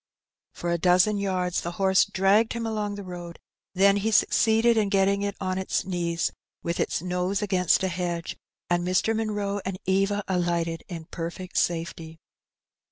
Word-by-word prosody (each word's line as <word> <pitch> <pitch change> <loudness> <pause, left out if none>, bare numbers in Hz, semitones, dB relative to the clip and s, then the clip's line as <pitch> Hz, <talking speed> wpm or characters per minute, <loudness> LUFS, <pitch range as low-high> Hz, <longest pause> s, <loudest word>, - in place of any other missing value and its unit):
For 175 - -3
a 170 - 0
dozen 185 +4 +3
yards 185 -3 -1
the 170 - -5
horse 190 +1 +3
dragged 200 +4 +2
him 230 0 -3
along 210 -2 -2
the 200 - -7
roadj 175 -2 -8 0.4
then 195 +2 +5
he 210 +2 0
succeeded 225 +1 +3
in 215 -3 +2
getting 195 0 +2
it 200 0 -2
on 185 -1 -2
it^ 190 -1 -1
knees 170 -2 -1 0.3
with 170 +1 -2
its - - -1
nose 180 +2 -1
against 185 -2 +2
a - - +2
hedge, 175 -2 -3 0.3
and 175 0 +1
Mr. 185 +5 +1
Munroe 205 -2 -2
and 190 0 -4
Eva 195 +2 +1
alighted 170 -3 -1
in 165 -3 -7
perfect 170 +3 -6
safety. 165 -1 -2
185 Hz, 165 wpm, -26 LUFS, 175-200 Hz, 0.4 s, then